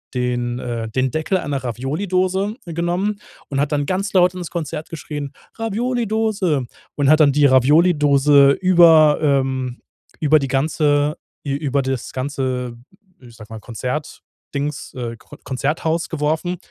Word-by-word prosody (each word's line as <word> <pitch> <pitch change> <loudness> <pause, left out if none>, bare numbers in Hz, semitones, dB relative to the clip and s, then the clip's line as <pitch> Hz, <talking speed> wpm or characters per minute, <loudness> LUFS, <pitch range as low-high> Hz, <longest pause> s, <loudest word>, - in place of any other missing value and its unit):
den, 120 -1 -1
äh, 115 -2 -4
den 130 +2 0
Deckel 160 +4 0
einer 140 -6 -3
Ravioli 135 - -3
Dose 190 +3 0
genommen 175 +5 -2 0.3
und 140 -1 -2
hat 145 +1 0
dann 145 -1 0
ganz 195 +5 -2
laut 180 -1 +4
ins 175 -2 -6
Konzert 160 -2 -5
geschrien: 145 -3 -6 0.3
„Ravioli-Dose“. 220 - -1 0.3
Und 145 -1 +1
hat 155 - +5
dann 140 -2 +5
die 145 0 +4
Ravioli-Dose 145 0 +5
über, 165 -4 +5
ähm 130 -3 0 0.4
über 155 0 +4
die 135 - -2
ganze 145 +2 +1 0.3
ü 135 - -1
über 140 -2 0
das 130 -2 -4
ganze 130 -3 -3 0.4
ich 120 -2 -15
sage 110 +1 -12
mal 110 - -7
Konzert-Dings 140 +4 -6
äh, 120 -2 -5
Kr - - -15
Konzerthaus 160 +5 -2
geworfen. 160 +3 -1
145 Hz, 140 wpm, -20 LUFS, 130-170 Hz, 0.4 s, hat